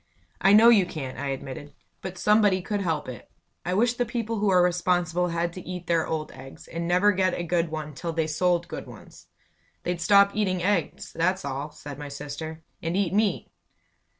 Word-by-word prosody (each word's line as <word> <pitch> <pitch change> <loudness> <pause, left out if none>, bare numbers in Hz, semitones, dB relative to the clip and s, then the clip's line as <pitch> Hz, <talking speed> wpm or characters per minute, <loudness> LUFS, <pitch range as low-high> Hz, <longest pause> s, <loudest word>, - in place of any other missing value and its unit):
"I 195 - +5
know 225 +3 +8
you 205 -6 +5
can't," 140 -7 -6
I 140 - -3
admitted. 135 +1 -6 0.3
"But 190 -1 -6
somebody 205 -3 +3
could 205 +1 -2
help 160 -5 -1
it. 125 -4 -9 0.3
I 180 +1 -1
wish 235 +4 +3
the 245 - 0
people 230 -2 -3
who 205 -1 +2
are 180 -2 +5
responsible 180 -1 +1
had 170 0 -1
to 185 - -7
eat 180 -1 -7
their 165 -2 +1
old 155 -1 -3
eggs, 135 +1 -12
and 170 0 -4
never 180 +4 +4
get 185 -2 +1
a 175 - -3
good 170 -1 0
one 155 -1 -5
till 170 +4 -4
they 160 -1 0
sold 175 +2 +1
good - - -7
ones!" - - -14 0.6
"They'd 175 -1 -2
stop 200 +3 +6
eating 185 -4 0
eggs, 185 -5 -1
that's 185 +2 0
all," 140 +2 -4
said 145 -1 -10
my 145 -1 -6
sister, 150 +3 -7 0.2
"and 165 +3 -1
eat 195 -3 0
meat." 210 0 0
175 Hz, 200 wpm, -26 LUFS, 160-195 Hz, 0.6 s, know